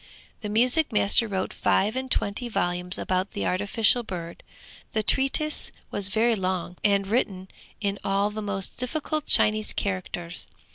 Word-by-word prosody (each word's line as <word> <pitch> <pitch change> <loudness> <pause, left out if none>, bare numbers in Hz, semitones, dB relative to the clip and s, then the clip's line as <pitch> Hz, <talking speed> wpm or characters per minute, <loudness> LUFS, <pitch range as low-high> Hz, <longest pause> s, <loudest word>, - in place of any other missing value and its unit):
The 210 - -5
music 250 +8 +5
master 210 +2 +3
wrote 190 -2 -3
five 210 +4 +1
and 260 0 -4
twenty 240 +1 -1
volumes 180 -3 -1
about 185 +3 -2
the 205 - -3
artificial 205 +5 +2
bird; 170 -6 -8 0.5
the 215 - 0
treatise 275 +6 +1 0.2
was 200 -1 +4
very 225 +3 +2
long 185 -2 -3
and 200 -1 +2
written 195 -3 -2 0.3
in 200 -2 -2
all 200 +1 0
the 215 +1 -6
most 200 -2 -1
difficult 305 +4 -3
Chinese 215 0 +3
characters. 175 -3 -4
205 Hz, 145 wpm, -25 LUFS, 190-230 Hz, 0.5 s, music